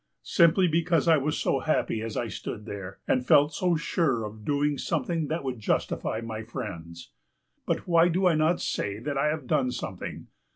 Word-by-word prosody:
Simply 175 +1 +4
because 165 -1 +1
I 160 -1 +6
was 150 +2 -1
so - - +1
happy 155 -7 0
as 115 -1 -4
I 120 - -1
stood 105 +1 -6
there, 100 -3 -7
and 125 - +2
felt 145 +4 +5
so 180 +1 +1
sure 150 -6 0
of 105 0 -9
doing 145 +2 0
something 165 0 -1
that 160 +2 -2
would 130 -3 -4
justify 110 +1 -1
my 110 -1 -5
friends. 85 -7 -7 0.6
But - - -1
why 170 -1 +5
do 180 +2 +1
I 180 - +5
not 155 +3 +2
say 100 0 -2
that 140 +6 -4
I 145 - +2
have 150 -2 -2
done 125 +1 +1
something? 125 - -6
145 Hz, 190 wpm, -27 LUFS, 110-165 Hz, 0.6 s, I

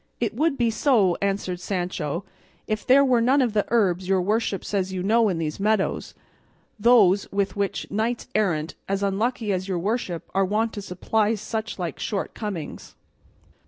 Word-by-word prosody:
"It 230 -3 -1
would 295 +4 +1
be 235 -2 +2
so," 220 -7 +3
answered 195 -2 -1
Sancho, 180 -4 -3 0.4
"if 215 -1 -3
there 275 +2 +6
were 250 -3 +3
none 260 +5 +4
of 245 -5 +1
the 210 -1 +1
herbs 190 -5 +1
your 190 -1 +3
worship 210 0 0
says 190 -2 -1
you 185 -1 -3
know 220 +2 +3
in 180 - -1
these 155 0 -3
meadows, 210 -1 0 0.6
those 205 -4 +4
with 200 +1 -1
which 200 -1 -2
knights 225 +3 -1
errant 170 -7 0 0.2
as 195 0 0
unlucky 215 +2 0
as 185 +1 -2
your 185 -2 -1
worship 185 -2 -2
are 195 - +3
wont 215 +4 0
to 205 - -5
supply 210 +4 0
such 220 +1 -4
like 175 -5 -4
shortcomings." 200 -4 -5
205 Hz, 165 wpm, -24 LUFS, 185-225 Hz, 0.6 s, there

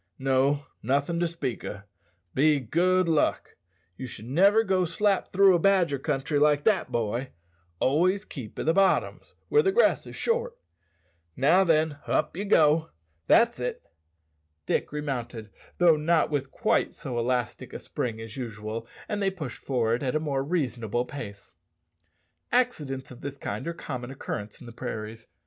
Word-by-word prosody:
No, 135 +2 +1 0.2
nothin' 140 +7 0
to 175 - +2
speak 165 -7 -4
o', 100 -1 -6 0.5
be 150 +2 +4
good 180 +8 +2
luck. 160 -2 0 0.4
Ye 130 - -6
should 110 -2 -10
niver 195 - +4
go 190 -3 +1
slap 195 +3 0
through 195 0 +6
a 175 - +3
badger 175 -6 +3
country 145 0 -1
like 145 0 +3
that, 205 -1 +2
boy; 120 +3 -1 0.5
always 185 +9 +2
keep 125 - -9
i' - - -2
the 160 - +2
bottoms, 195 +1 +1
where 445 - +5
the 385 - +2
grass 475 +5 +3
is - - -9
short. 475 +1 -1 0.8
Now 165 +9 +4
then, 155 -4 +2
up - - 0
ye 200 +4 -3
go. 160 -3 +4 0.4
That's 235 +1 +4
it!" - - -4 0.8
Dick - - -1
remounted, 125 -7 -4 0.3
though 170 -3 +5
not 160 +1 +2
with 140 -2 -1
quite - - 0
so 125 -3 -4
elastic 125 -1 -2
a - - -5
spring 115 -3 -4
as 115 -1 -8
usual, 115 -2 -5 0.2
and 205 -1 -2
they 195 - +2
pushed 155 -10 -7
forward 120 -3 0
at 135 0 -1
a - - +3
more 140 -3 -1
reasonable 125 - -1
pace. 105 -8 -9 1.0
Accidents 150 - 0
of 125 - -12
this 140 0 -6
kind 150 - -5
are - - 0
of 170 - -6
common 125 0 -6
occurrence 105 -5 -6
in - - -12
the 120 - -9
prairies. 110 -1 -6
145 Hz, 165 wpm, -27 LUFS, 125-180 Hz, 1.0 s, through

